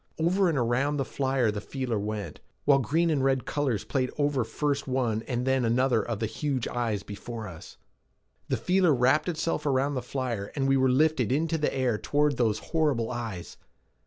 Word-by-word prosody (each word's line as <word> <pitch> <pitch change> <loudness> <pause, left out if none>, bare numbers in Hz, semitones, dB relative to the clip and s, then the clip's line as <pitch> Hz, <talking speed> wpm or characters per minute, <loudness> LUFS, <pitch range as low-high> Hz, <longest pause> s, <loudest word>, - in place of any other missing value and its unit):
Over 180 +4 +2
and 160 - 0
around 130 +4 +1
the 135 - 0
flyer 130 -5 0
the 105 -1 -4
feeler 125 -3 -3
went, 105 0 -4 0.3
while 140 -1 +5
green 165 +6 +1
and 140 -4 +1
red 135 -1 +1
colors 135 -9 -1
played 130 -2 -1
over 145 -4 +1
first 140 +5 -2
one 125 -4 0
and 125 -1 -1
then 130 -1 +2
another 120 0 +2
of 115 -3 -3
the 110 - -1
huge 130 +3 -2
eyes 115 -5 -2
before 110 +2 -7
us. 85 -3 -11 0.7
The - - +1
feeler 180 -4 +3
wrapped 130 +7 +3
itself 165 -2 -1
around 140 0 +1
the 130 - -2
flyer 120 -5 -3
and 135 -2 0
we 135 - +4
were 130 -1 +3
lifted 135 -2 +2
into 160 +4 +1
the 150 - +1
air 125 -5 0
toward 145 -2 +1
those 110 -4 +2 0.2
horrible 145 -8 +1
eyes. 115 -8 -6
130 Hz, 190 wpm, -27 LUFS, 115-145 Hz, 0.7 s, while